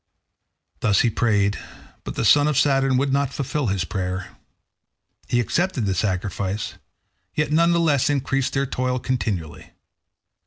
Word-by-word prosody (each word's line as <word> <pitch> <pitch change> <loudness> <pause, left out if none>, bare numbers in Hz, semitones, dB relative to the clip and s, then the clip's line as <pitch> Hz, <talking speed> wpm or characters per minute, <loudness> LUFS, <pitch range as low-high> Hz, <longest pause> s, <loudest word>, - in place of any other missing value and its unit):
Thus 100 -2 +3
he 120 - +2
prayed, 105 -3 +1 0.4
but - - -6
the - - -1
son 145 +6 +5
of 150 -3 0
Saturn 135 -2 +3
would 135 +1 +1
not 140 -1 +1
fulfil 140 -1 -2
his 95 -3 0
prayer. 95 0 -3 1.0
He 120 - +1
accepted 160 - 0
the 95 - +1
sacrifice, 100 +1 -2 0.6
yet 150 -1 0
none 170 +2 +4
the 170 - +2
less 150 -6 +2
increased 135 -2 0
their 135 0 +1
toil 130 -1 -1
continually. 110 - -3
125 Hz, 145 wpm, -23 LUFS, 100-140 Hz, 1.0 s, son